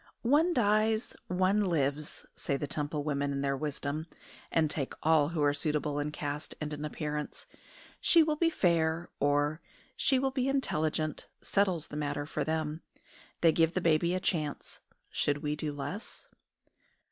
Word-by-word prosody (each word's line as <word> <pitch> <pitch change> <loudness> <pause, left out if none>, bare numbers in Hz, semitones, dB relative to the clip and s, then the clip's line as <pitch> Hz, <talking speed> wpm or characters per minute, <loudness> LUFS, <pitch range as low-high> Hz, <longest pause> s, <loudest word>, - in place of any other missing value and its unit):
"One 295 +8 +4
dies, 220 -3 +2
one 185 +3 +2
lives," 150 -4 -1
say 140 - -1
the 145 - -2
Temple 145 +1 -2
women 145 -1 0
in 140 0 -2
their 140 0 +1
wisdom, 150 +2 -3 0.4
and 160 -1 +3
take 145 -2 -3
all 155 -2 +4
who 165 -3 -1
are 145 0 +4
suitable 150 0 -1
in 150 +1 -2
caste 145 0 -4
and 150 -1 -3
in 150 0 -5
appearance. 150 0 -4 0.5
"She 335 -2 +6
will 305 -1 +1
be 330 +2 +3
'fair,'" 170 - +1
or, 145 +2 +2 0.3
"She 265 - +3
will 265 +1 +1
be 260 0 0
intelligent," 155 - 0 0.2
settles 185 -6 +1
the 150 - -6
matter 145 -1 -2
for 150 - -2
them. 155 0 -2 0.6
They 165 - +6
give 165 +1 +2
the - - +3
baby 170 +1 +2
a - - 0
chance: 155 -5 -2 0.3
should 145 0 0
we 150 0 0
do 150 0 -2
less? 145 +10 -6
155 Hz, 160 wpm, -31 LUFS, 145-185 Hz, 0.6 s, She